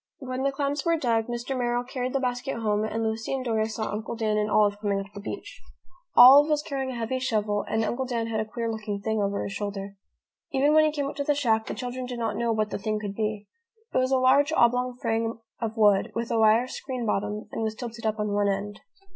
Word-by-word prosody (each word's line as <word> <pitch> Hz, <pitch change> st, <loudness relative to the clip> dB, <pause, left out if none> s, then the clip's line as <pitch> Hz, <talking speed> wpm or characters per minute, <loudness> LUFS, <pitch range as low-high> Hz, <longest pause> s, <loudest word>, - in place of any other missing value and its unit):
When 255 Hz, -1 st, -5 dB
the 275 Hz, +1 st, +1 dB
clams 280 Hz, +1 st, -2 dB
were 335 Hz, -1 st, +2 dB
dug, 230 Hz, -6 st, +1 dB
Mr. 240 Hz, +2 st, -3 dB
Merrill 245 Hz, -1 st, 0 dB
carried 255 Hz, 0 st, -4 dB
the 275 Hz, -, +1 dB
basket 250 Hz, +1 st, -2 dB
home 210 Hz, -2 st, 0 dB
and 225 Hz, +1 st, -2 dB
Lucy 220 Hz, +3 st, -2 dB
and 260 Hz, -1 st, -4 dB
Dora 220 Hz, -2 st, 0 dB
saw 220 Hz, 0 st, -3 dB
Uncle 215 Hz, +3 st, -4 dB
Dan 220 Hz, -2 st, 0 dB
and 210 Hz, 0 st, 0 dB
Olive 205 Hz, -1 st, +3 dB
coming 200 Hz, -2 st, 0 dB
up 195 Hz, +1 st, -8 dB
the 200 Hz, -, -8 dB
beach. 200 Hz, -, -7 dB, 0.5 s
Olive 275 Hz, +5 st, +9 dB
was 300 Hz, -1 st, +1 dB
carrying 270 Hz, -2 st, -3 dB
a 255 Hz, -, -5 dB
heavy 235 Hz, +2 st, -2 dB
shovel 210 Hz, -4 st, 0 dB
and 220 Hz, 0 st, 0 dB
Uncle 250 Hz, +5 st, -2 dB
Dan 235 Hz, -2 st, -2 dB
had 225 Hz, -1 st, -2 dB
a 215 Hz, -, -1 dB
queer 230 Hz, +1 st, -3 dB
looking 215 Hz, -2 st, -4 dB
thing 220 Hz, +1 st, -1 dB
over 200 Hz, 0 st, -1 dB
his 200 Hz, -, -5 dB
shoulder. 200 Hz, -1 st, -5 dB, 0.5 s
Even 280 Hz, +2 st, +3 dB
when 310 Hz, 0 st, +6 dB
he 310 Hz, -, +2 dB
came 290 Hz, -2 st, -2 dB
up 280 Hz, -, -5 dB
to 285 Hz, -, -1 dB
the 290 Hz, +1 st, +1 dB
shack 225 Hz, -6 st, +1 dB
the -, -, -4 dB
children 250 Hz, 0 st, -5 dB
did 245 Hz, -1 st, -5 dB
not 225 Hz, -3 st, -2 dB
know 235 Hz, +1 st, 0 dB
what 215 Hz, -1 st, 0 dB
the -, -, -3 dB
thing 215 Hz, +1 st, -1 dB
could 205 Hz, -2 st, -5 dB
be. 210 Hz, -1 st, -3 dB, 0.5 s
It -, -, +3 dB
was 255 Hz, 0 st, +1 dB
a 265 Hz, -, +3 dB
large 275 Hz, +4 st, +4 dB
oblong 250 Hz, -2 st, +2 dB
frame 225 Hz, -2 st, -1 dB, 0.2 s
of 225 Hz, -1 st, -3 dB
wood, 205 Hz, -3 st, +4 dB
with 230 Hz, 0 st, -2 dB
a 230 Hz, -, +2 dB
wire 220 Hz, +2 st, +5 dB
screen 255 Hz, -2 st, -5 dB
bottom, 210 Hz, 0 st, -2 dB
and -, -, -4 dB
was 220 Hz, -1 st, -2 dB
tilted 230 Hz, -1 st, -5 dB
up 215 Hz, 0 st, -1 dB
on 210 Hz, 0 st, -1 dB
one 205 Hz, 0 st, +2 dB
end. 200 Hz, +1 st, -3 dB
230 Hz, 245 wpm, -26 LUFS, 215-255 Hz, 0.5 s, Olive